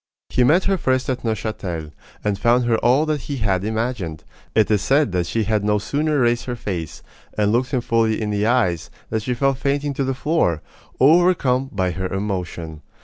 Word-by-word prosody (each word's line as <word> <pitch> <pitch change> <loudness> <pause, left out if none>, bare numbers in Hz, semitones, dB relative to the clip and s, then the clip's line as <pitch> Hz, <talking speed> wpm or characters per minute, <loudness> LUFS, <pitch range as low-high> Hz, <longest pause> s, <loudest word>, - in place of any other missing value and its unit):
He 125 - +2
met 160 +9 +4
her 195 -2 +1
first 130 -1 +1
at 130 0 -4
Neuchatel, 100 -8 -3 0.3
and 105 -2 -1
found 120 +1 +3
her 120 -1 +2
all 130 +6 +3
that 155 -2 -1
he 140 +1 -5
had 100 -5 0
imagined. 110 -7 -3 0.3
It 110 -1 +3
is 105 -2 +3
said 140 +1 +2
that 90 -1 -1
she 115 +4 0
had 105 0 0
no 105 0 +2
sooner 145 +7 0
raised 120 0 +1
her 125 - -3
face, 90 -9 -5 0.3
and 105 -1 +2
looked 125 +3 +1
him 130 -3 0
fully 115 -2 +1
in 105 -1 -2
the 105 +1 0
eyes, 100 -10 +1 0.2
than 110 - +1
she 125 +3 -2
fell 135 +3 +2
fainting 140 +2 -1
to 140 - -1
the 135 0 -1
floor, 125 - 0 0.4
overcome 140 -4 +4
by 95 -2 0
her 95 +2 -3
emotion. 90 -5 -4
115 Hz, 200 wpm, -21 LUFS, 100-130 Hz, 0.4 s, met